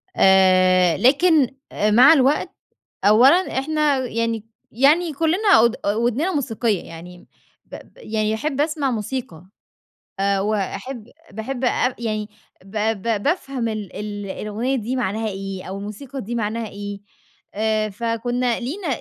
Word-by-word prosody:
آآ، 185 -2 +4
لكن 285 +2 +4 0.2
آآ 210 +1 0
مع 255 +8 +8
الوقت 275 0 +2 0.6
أولًا 260 - +5
إحنا 300 0 +1
يعني 230 -3 -2 0.3
يعني 305 +8 +3
كلّنا 330 +8 0
أود 235 +1 +4
أ 200 - +1
ودننا 245 - 0
موسيقية، 230 - -1
يعني 175 +2 -12 0.4
ب - - -13
ب - - -16
يعني 220 - -2
أحب 280 +4 -2
أسمع 295 -3 0
موسيقى 220 -6 -5 0.7
آآ، 195 0 +1
وأحب 215 +4 -3 0.2
باحب 240 +5 -5
أب 250 +1 +1
يعني 215 -2 -3 0.4
ب 195 +2 -8 0.2
ب 220 -1 -1
بافهم 275 -6 -1
ال 215 -3 -5
ال 205 -1 -5
الأغنية 220 +7 -3
دي 245 +2 -3
معناها 220 -2 -2
إيه، 195 -1 -5
أو 190 +1 -6
الموسيقى 240 +7 -7
دي 235 +3 -5
معناها 225 0 -2
إيه، 205 0 -7 0.5
آآ، 215 0 0
فكُنا 235 +3 -1
لينا 325 +10 -5
230 Hz, 135 wpm, -21 LUFS, 205-270 Hz, 0.7 s, مع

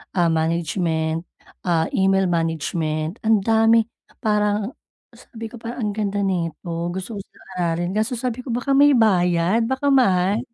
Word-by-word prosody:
ah, 175 -2 +3
management, 160 0 -1 0.4
ah, 165 -2 +1
email 195 0 +2
management. 165 +1 -2
Ang 220 -3 +4
dami, 225 +1 +4 0.4
parang 210 0 +1 0.4
sabi 225 -2 -10
ko, 240 - -10
"Parang 235 +1 -7
ang 210 - 0
ganda 205 -1 -2
neto, 170 -2 -2
gusto-gusto 195 +1 -6
kong - - -17
aralin", 175 +1 -1
kaso 215 +5 -1
sabi 245 0 -3
ko, 250 - -9
"Baka 245 +3 -2
may 285 +1 +6
bayad, 185 -1 +2
baka 265 +3 0
mahal", 200 -6 +3
195 Hz, 140 wpm, -22 LUFS, 170-225 Hz, 0.4 s, may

